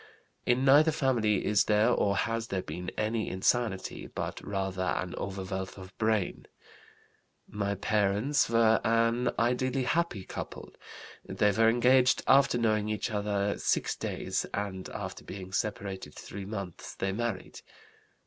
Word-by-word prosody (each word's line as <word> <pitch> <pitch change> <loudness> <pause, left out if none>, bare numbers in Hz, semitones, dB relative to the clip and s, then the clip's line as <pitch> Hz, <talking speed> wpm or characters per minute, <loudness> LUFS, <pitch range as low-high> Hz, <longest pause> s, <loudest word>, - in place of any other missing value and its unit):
"In 125 +2 +3
neither 145 +4 +7
family 115 -9 +1
is 105 -1 +3
there 105 +1 +3
or 100 0 +2
has 115 0 -1
there 95 -3 -2
been 90 0 -5
any 110 +1 -1
insanity, 95 +1 -1
but - - -5
rather 95 -2 -3
an 90 -1 -1
overwealth 95 -1 -5
of 95 0 -11
brain. 110 -4 0 1.0
"My 100 -1 -2
parents 105 +8 +1
were 115 -1 +4
an 115 +2 +2
ideally 125 +2 +1
happy 140 - 0
couple. - - -7 0.5
They 105 - +1
were 110 +2 +4
engaged 125 +2 +4
after 135 -2 +5
knowing 110 -2 +1
each 110 +2 -2
other 100 -1 -1
six - - 0
days, - - -2
and 95 -2 -4
after - - -6
being 95 -1 -8
separated 100 -2 -3
three 100 0 -8
months 100 -4 -6
they 95 - -1
married. 115 -1 -4
105 Hz, 135 wpm, -29 LUFS, 95-120 Hz, 1.0 s, neither